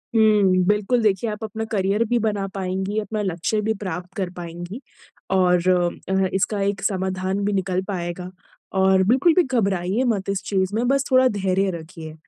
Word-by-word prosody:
हुँ, 205 -4 +4
बिल्कुल, 210 +4 +2
देखिए, 210 +1 +1
आप 210 +1 -6
अपना 220 +1 -4
करियर 200 +1 +1
भी 240 - +2
बना 205 -3 -1
पाएँगी, 190 +2 -2
अपना 215 0 -3
लक्ष्य 190 +2 -1
भी 220 +1 0
प्राप्त 180 -1 -5
कर 185 -2 -1
पाएँगी 175 +6 -7 0.5
और 180 -1 +3 0.4
अ, 190 0 +2
इसका 200 +1 0
एक 200 -1 -1
समाधान 190 0 -1
भी 205 - 0
निकल 185 -1 0
पाएगा 180 -1 -4 0.5
और 190 0 +4
बिल्कुल 270 - +4
भी 360 +2 +4
घबराइए 200 - 0
मत 205 -6 -1
इस 200 0 -1
चीज़ 190 0 0
में, 240 +2 0
बस 275 +1 +2
थोड़ा 255 0 +6
धैर्य 195 -3 0
रखिए। 160 -1 -10
195 Hz, 170 wpm, -22 LUFS, 185-215 Hz, 0.5 s, थोड़ा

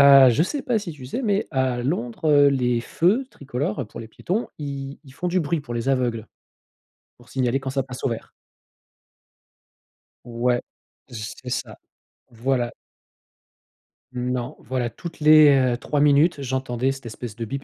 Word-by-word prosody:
heu, 140 -2 +9
je 135 +7 +3
sais 280 - -2
pas 240 -3 +1
si 180 -5 -6
tu 140 -4 -12
sais, 245 - -3
mais 205 -3 +1
à 130 -3 0
Londres, 125 -1 -2
heu, 145 -1 +7
les 125 -3 +1
feux 190 - +1
tricolores 130 -3 -3
pour 115 - -9
les 115 - -9
piétons, 190 - -2
i 140 -2 -5
ils 135 - -14
font 175 +6 -3
du 185 +1 +1
bruit 155 0 -1
pour 120 -4 -7
les 120 +2 -2
aveugles, 120 -4 0 0.9
pour 120 0 -19
signaler 130 0 0
quand 135 - -5
ça 135 0 0
passe 130 0 -9
au - - +2
vert. 115 - -6 1.9
Ouais, 120 +1 0 0.5
z 110 -3 -6
c'est 125 - -7
ça. - - -3 0.6
Voilà. 120 +1 -1 1.4
Non, 125 0 -3
voilà. 125 0 -2
Toutes 170 +5 -9
les, 155 0 +8 0.3
heu, - - -2
3 145 +3 -1
minutes, 145 +2 +4
j'entendais 130 -1 -1
cette 135 -2 -8
espèce 115 0 -7
de 115 - -3
bip, 135 +5 -5
130 Hz, 165 wpm, -23 LUFS, 120-145 Hz, 1.9 s, heu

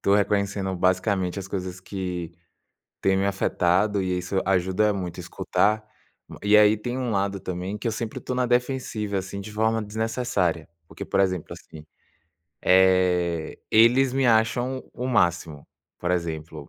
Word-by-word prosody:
tô 100 - +3
reconhecendo, 100 -2 0
basicamente, 95 +1 0
as 95 - -6
coisas 95 -2 -5
que 90 -3 -5 0.7
têm 95 0 +2
me 95 - +1
afetado 100 +1 +1
e 90 -1 -1
aí 90 - 0
isso 90 +2 -2
ajuda 95 +3 +2
muito 90 -4 -5
escutar. 110 +1 0 0.6
E 105 +1 +3
aí, 105 0 +6
tem 120 +4 -4
um 125 -2 -2
lado 100 -1 -1
também, 95 +2 -4
que 115 - -2
eu - - -1
sempre 115 0 -4
estou 125 - -4
na 125 - +1
defensiva, 120 -4 -1
assim, 95 +1 -6
de 100 +2 -8
forma 110 +1 0
desnecessária, 105 -6 -1 0.2
porque, - - -10
por - - 0
exemplo, 95 -4 0
assim, 75 -1 -13 0.8
eh, 90 -3 +3
eles 125 +4 +5
me 135 0 +1
acham 120 +3 +1
o 125 - -4
máximo, 85 - 0 0.3
por 90 - -2
exemplo, 80 -4 -3
100 Hz, 155 wpm, -25 LUFS, 90-110 Hz, 0.8 s, aí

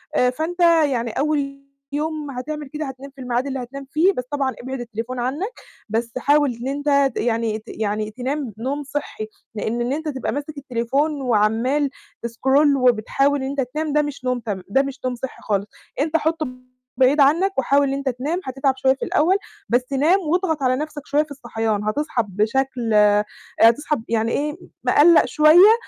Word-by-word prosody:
آآ، 250 - +4
فأنت 320 +7 -4 0.3
يعني 240 -5 -1
أول 275 0 -1 0.3
يوم 300 0 -3
هتعمل 295 +3 -5
كده 305 +2 -4
هتنام 270 0 -8
في 270 - -11
الميعاد 250 +1 -1
اللي 270 -1 -3
هتنام 275 +3 -8
فيه، 350 +6 +3
بس 250 - -3
طبعًا 275 -3 0
إبعِد 265 +1 -5
التليفون 235 +1 -5
عنك، 270 +10 -1 0.4
بس 230 +2 -1
حاول 290 -1 +3
إن 235 +2 -6
أنت 280 -1 +1
يعني 225 -2 0
ت - - -23
يعني 215 0 -2
تنام 255 0 -3
نوم 270 +6 -3
صحّي، 280 -6 -5 0.3
لإن 220 +3 -2
إن 245 +3 0
أنت 315 +2 -4
تبقى 265 -3 -3
ماسك 290 +1 -5
التليفون، 275 +3 -1
وعمال 245 +4 +2 0.3
تسكرول 265 +5 +3
وبتحاول 265 +3 +2
إن 265 - -2
أنت 280 0 -1
تنام، 300 +4 -3
ده 300 - +4
مش 290 -3 -6
نوم 250 -1 0
تم 205 -5 -4
ده 270 +7 +4
مش 275 0 -5
نوم 255 -1 -1
صحّي 250 +2 -7
خالص، 200 -1 -1 0.3
أنت 315 +2 +2
حطُه 320 0 -1 0.5
بعيد 265 +3 +4
عنك، 330 +8 +4
وحاول 280 +1 +3
إن 270 - -1
أنت 275 0 -1
تنام، 275 +8 -2
هتتعب 270 +1 0
شوية 265 0 +3
في - - -4
الأول، 340 +5 +3 0.3
بس 250 +3 0
نام 310 +8 +4
واضغط 325 -3 0
على 255 0 +3
نَفسك 300 +2 -5
شوية 295 +1 +2
في 300 - -17
الصحيان، 225 -6 -2
هتصحي 240 +3 0
بشكل 230 +4 0
آآ، 210 0 +5 0.4
هتصحي 280 +7 +5
يعني 230 0 +1
إيه 300 +2 -1 0.3
مقلّق 335 +3 +6
شوية، 340 +7 +7
270 Hz, 180 wpm, -22 LUFS, 240-295 Hz, 0.5 s, شوية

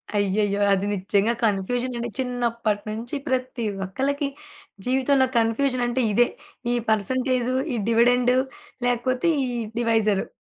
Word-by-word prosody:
అయ్యయ్యో! 205 0 +1
అది 195 +1 0
నిజ్జంగా 200 +3 +1
కన్ఫ్యూజనంటే, 240 +4 -1
చిన్నప్పటి 235 -4 -1
నుంచి 230 +5 -5
ప్రతి 255 -2 -1 0.2
ఒక్కళ్ళకి, 275 +8 -1 0.6
జీవితంలో 265 +1 +3
కన్ఫ్యూజనంటే 245 +2 +1
ఇదే. 240 +4 +4 0.5
ఈ - - +2
పర్సెంటేజు, 255 +3 +1 0.2
ఈ - - -1
డివిడెండ్ 245 +2 +4 0.5
లేకపోతే 255 +5 +1 0.2
ఈ - - -2 0.3
డివైజరు. 220 -4 +2
240 Hz, 105 wpm, -24 LUFS, 215-255 Hz, 0.6 s, ఇదే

